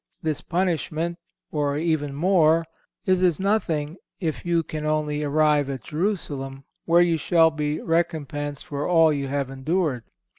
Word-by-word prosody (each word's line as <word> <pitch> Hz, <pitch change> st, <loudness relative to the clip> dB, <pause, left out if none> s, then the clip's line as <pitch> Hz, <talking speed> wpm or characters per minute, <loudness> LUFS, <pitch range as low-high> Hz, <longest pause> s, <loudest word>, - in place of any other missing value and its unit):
This 155 Hz, -2 st, -1 dB
punishment, 170 Hz, -1 st, -1 dB, 0.3 s
or 145 Hz, -1 st, 0 dB
even 150 Hz, -3 st, -1 dB
more, 165 Hz, -1 st, +3 dB, 0.4 s
is 185 Hz, -1 st, +2 dB
as 180 Hz, -3 st, +3 dB
nothing 170 Hz, -6 st, 0 dB, 0.2 s
if 160 Hz, -4 st, -3 dB
you 170 Hz, -1 st, +1 dB
can 155 Hz, -1 st, -5 dB
only 150 Hz, -1 st, 0 dB
arrive 150 Hz, -1 st, +2 dB
at 135 Hz, -4 st, -5 dB
Jerusalem, 145 Hz, -6 st, -3 dB, 0.2 s
where 170 Hz, +1 st, +5 dB
you 170 Hz, -2 st, +1 dB
shall 165 Hz, +1 st, +4 dB
be 150 Hz, 0 st, -2 dB
recompensed 145 Hz, -4 st, -2 dB
for 145 Hz, 0 st, -3 dB
all 165 Hz, -3 st, +5 dB
you 140 Hz, -1 st, -2 dB
have 140 Hz, -1 st, -2 dB
endured. 135 Hz, -1 st, -1 dB
155 Hz, 145 wpm, -24 LUFS, 145-170 Hz, 0.4 s, where